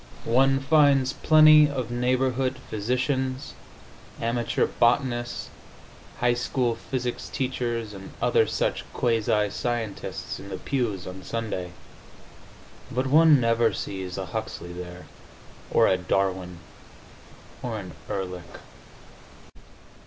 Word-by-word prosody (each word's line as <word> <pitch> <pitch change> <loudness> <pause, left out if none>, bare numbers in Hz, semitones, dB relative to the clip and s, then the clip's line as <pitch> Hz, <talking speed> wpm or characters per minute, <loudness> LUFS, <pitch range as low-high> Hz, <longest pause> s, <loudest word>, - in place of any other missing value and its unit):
One 135 +3 +3
finds 140 -2 +4
plenty 155 -1 +7
of 130 -4 -4
neighborhood 130 +1 0
physicians, 130 +4 -1 0.7
amateur 115 0 0
botanists, 120 0 0 0.7
high 120 0 +3
school 120 0 0
physics 125 -1 -4
teachers 120 -4 -2
and 95 -1 -9
other - - +3
such - - -1
quasi 110 -3 +1
scientists 115 -3 -4
in 100 - -10
the 95 - -4
pews 110 -9 -2
on 95 +1 -8
Sunday, 95 -5 -4 1.2
but 130 +2 -1
one 155 +1 +6
never 115 -1 +2
sees 95 -2 -5
a 95 - -3
Huxley 90 -3 -5
there, 90 0 -8 0.6
or - - +4
a 95 - +3
Darwin, 90 -1 -1 1.0
or 120 -4 -3
an 95 -4 -7 0.2
Ehrlich. 90 -3 -5
120 Hz, 105 wpm, -26 LUFS, 100-130 Hz, 1.2 s, plenty